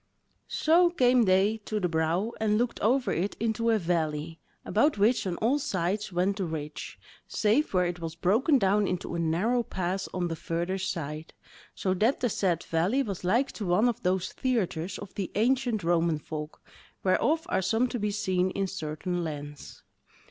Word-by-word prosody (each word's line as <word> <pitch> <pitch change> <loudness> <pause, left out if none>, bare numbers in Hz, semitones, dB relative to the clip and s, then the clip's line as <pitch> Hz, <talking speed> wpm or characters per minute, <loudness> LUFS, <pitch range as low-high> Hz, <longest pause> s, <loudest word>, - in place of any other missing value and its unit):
So 340 +3 +4
came 250 -7 +4
they 195 +3 +3
to 215 - -2
the 180 - +1
brow 165 +6 0
and 210 -1 +2
looked 240 +1 -1
over 250 +5 +2
it 190 +5 -1
into 230 +1 0
a 225 - +4
valley, 165 -3 -2 0.3
about 285 +5 +2
which 210 +1 +2
on 180 - -2
all 250 +7 +2
sides 195 -2 -2
went 185 +3 0
the 195 - -1
ridge, 155 -2 -6 0.3
save 220 +8 +1
where 180 -1 +2
it 175 0 -3
was 165 -1 -5
broken 230 - +3
down 200 -2 +2
into 180 -1 -3
a 170 - -2
narrow 180 +10 +1
pass 190 -3 -3
on 180 -1 -1
the 165 - -3
further 170 +4 -2
side, 160 -4 -4 0.4
so 185 - 0
that 220 +8 +2
the 245 - +1
said 180 -5 0
valley 185 +12 +1
was 195 -6 -5
like 235 +10 +2
to 210 - -6
one 180 +7 +3
of 240 - -1
those 185 0 0
theatres 195 -8 -1
of 205 - -9
the 195 -3 -4
ancient 235 -1 +1
Roman 170 -1 +2
Folk, 150 0 -7 0.4
whereof 310 - +2
are - - +1
some 225 +6 +2
to 245 - -3
be 210 0 0
seen 185 -3 0
in 195 +1 -1
certain 175 0 -3
lands. 145 -2 -7
190 Hz, 180 wpm, -28 LUFS, 170-225 Hz, 0.4 s, So